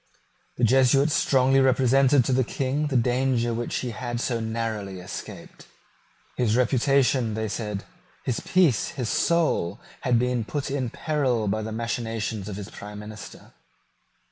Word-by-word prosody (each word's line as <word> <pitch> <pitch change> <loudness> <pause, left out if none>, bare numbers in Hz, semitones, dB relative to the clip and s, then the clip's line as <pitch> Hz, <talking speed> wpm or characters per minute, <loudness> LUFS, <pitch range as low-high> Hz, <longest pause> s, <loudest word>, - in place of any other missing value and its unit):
The 120 - -4
Jesuits 135 +4 +4
strongly 135 0 +3
represented 135 0 +4
to 130 - +1
the 130 +1 +3
King 135 +4 -1
the 135 -3 +1
danger 125 0 +1
which 120 +1 -3
he 125 - -3
had 120 +1 -4
so 120 -1 -1
narrowly 110 -4 -3
escaped. 90 - -9 0.7
His 115 -2 +1
reputation, 130 -2 +2
they 110 0 -2
said, 105 -1 -4 0.4
his 125 - -1
peace, 170 - +2
his 125 -5 -2
soul, 155 - +1 0.2
had 125 -2 +2
been 125 0 0
put 140 +4 -4
in 135 -3 -1
peril 130 -7 -1
by 110 +2 0
the 110 +1 -5
machinations 115 -2 -3
of 100 - -5
his 100 0 -7
prime 105 0 -9
minister. 105 0 -10
120 Hz, 145 wpm, -25 LUFS, 110-135 Hz, 0.7 s, Jesuits